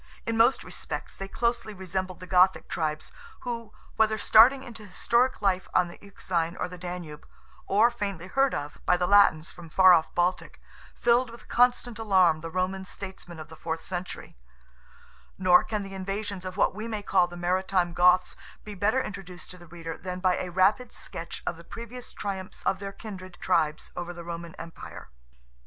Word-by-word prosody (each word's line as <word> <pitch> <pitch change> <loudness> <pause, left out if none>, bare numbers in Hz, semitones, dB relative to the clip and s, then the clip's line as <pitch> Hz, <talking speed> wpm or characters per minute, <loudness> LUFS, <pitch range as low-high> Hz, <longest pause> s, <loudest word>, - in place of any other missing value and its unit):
In 230 - -1
most 230 +4 +4
respects - - -6
they 195 - -6
closely 235 0 -1
resembled 185 0 -4
the 185 - -8
Gothic 185 +1 +4
tribes, 155 -1 -3 0.3
who, 230 -3 -5 0.3
whether 220 0 +3
starting 250 +6 +6
into 225 -4 -10
historic 235 +5 +1
life 190 -2 +1
on 180 -1 +3
the 170 - -13
Euxine 175 -4 -3
or - - -2
the 180 0 -10
Danube, 175 -4 -7 0.4
or 220 +5 +4
faintly 200 -7 -4
heard 270 +8 +2
of 145 +1 -5
by 180 - +5
the 180 - +1
Latins 175 -4 +5
from 175 -1 -12
the 155 - -18
far 185 -1 +8
off 165 -2 +2
Baltic, 180 +1 0 0.4
filled 240 +1 +3
with 235 +1 -13
constant 245 -1 +2
alarm 185 -7 +4
the 165 +1 -6
Roman 185 +2 -1
statesmen 190 -2 -8
of 155 - -9
the 160 - -11
fourth 160 0 -4
century; 180 -1 -6 1.0
nor 180 -1 +6
can 210 -2 -3
the 195 0 -9
invasions 195 0 -4
of 185 +1 -6
what - - +3
we 215 +3 -5
may 215 -2 -4
call 185 -3 +3
the 175 0 -10
maritime 180 0 +1
Goths 180 +1 +4 0.3
be 210 - -8
better 215 +7 +1
introduced 185 -3 -8
to 180 - -11
the 175 - -14
reader 165 0 -7
than 180 0 -5
by 185 -1 +2
a 180 - -3
rapid 195 +7 +2
sketch 165 - -6
of 175 - -2
the 170 - -12
previous 235 +6 -9
triumphs 190 -2 -6
of 190 - +1
their 200 0 -5
kindred 185 -3 -9
tribes 155 -4 0
over 175 0 -5
the 170 0 -9
Roman 170 0 -7
Empire. 165 - -10
185 Hz, 185 wpm, -27 LUFS, 175-210 Hz, 1.0 s, far